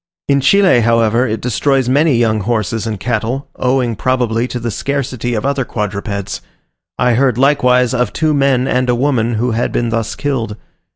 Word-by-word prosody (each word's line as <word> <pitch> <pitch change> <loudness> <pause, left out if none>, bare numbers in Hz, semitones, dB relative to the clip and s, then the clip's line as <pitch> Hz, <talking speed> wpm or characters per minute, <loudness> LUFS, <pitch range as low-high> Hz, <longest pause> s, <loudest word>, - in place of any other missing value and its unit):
In 140 -1 +2
Chile, 185 -1 +4
however, 115 +1 +2
it 110 0 -3
destroys 130 +2 0
many 145 +2 +3
young 110 -2 +1
horses 110 +1 -2
and 105 -3 -4
cattle, 120 +5 -2
owing 125 -2 0
probably 120 -1 0
to 125 - -5
the 115 0 -3
scarcity 125 0 -3
of 110 - -3
other 140 -1 0
quadrupeds: 100 -3 -4 0.6
I 125 -1 +2
heard, 125 -1 +2
likewise, 125 -2 +3
of 125 -3 0
two 155 -1 0
men 135 -2 +2
and 125 0 0
a 120 - +3
woman 120 -3 0
who 120 +3 0
had 115 +2 -1
been 120 -1 -1
thus 115 -1 -2
killed. 120 -7 -3
125 Hz, 175 wpm, -15 LUFS, 115-135 Hz, 0.6 s, Chile